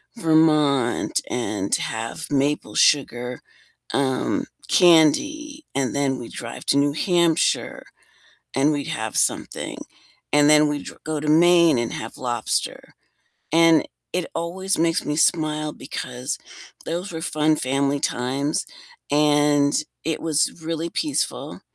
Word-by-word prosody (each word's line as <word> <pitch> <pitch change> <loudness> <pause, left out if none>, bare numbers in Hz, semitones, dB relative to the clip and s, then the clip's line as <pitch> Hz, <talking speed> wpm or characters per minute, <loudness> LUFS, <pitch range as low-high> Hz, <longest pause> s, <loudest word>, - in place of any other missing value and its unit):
Vermont 155 - +2
and 105 -5 -2
have 115 +8 -4
maple 140 +1 0
sugar, 125 -4 +2 0.5
um, 130 -2 0 0.2
candy, 295 - +3
and 135 -2 0
then 135 -2 0
we'd 120 - -9
drive 120 -1 -8
to - - +3
New 145 0 +2
Hampshire, 170 0 +1 0.7
and 140 +3 +3
we'd 145 -1 -3
have 110 0 -4
something, - - -1 0.6
and 145 0 +5
then 150 0 +6
we'd 145 -1 -4
dr - - -10
go 155 -1 -3
to 150 - -4
Maine 170 -2 +5
and 120 - -2
have 115 - -7
lobster. 120 -2 -3 0.6
And 165 -1 +5 0.3
it 180 -1 -1
always 190 +3 -2
makes 165 0 +1
me 150 - -2
smile 155 -2 +1
because 125 +4 -5 0.5
those 175 +3 -4
were 160 - -5
fun 155 -1 +1
family 140 +2 0
times, 135 +5 -1 0.4
and 145 -1 +3 0.3
it 160 -1 -2
was 160 +1 0
really 165 +1 -3
peaceful. 300 - -3
150 Hz, 125 wpm, -22 LUFS, 135-165 Hz, 0.7 s, then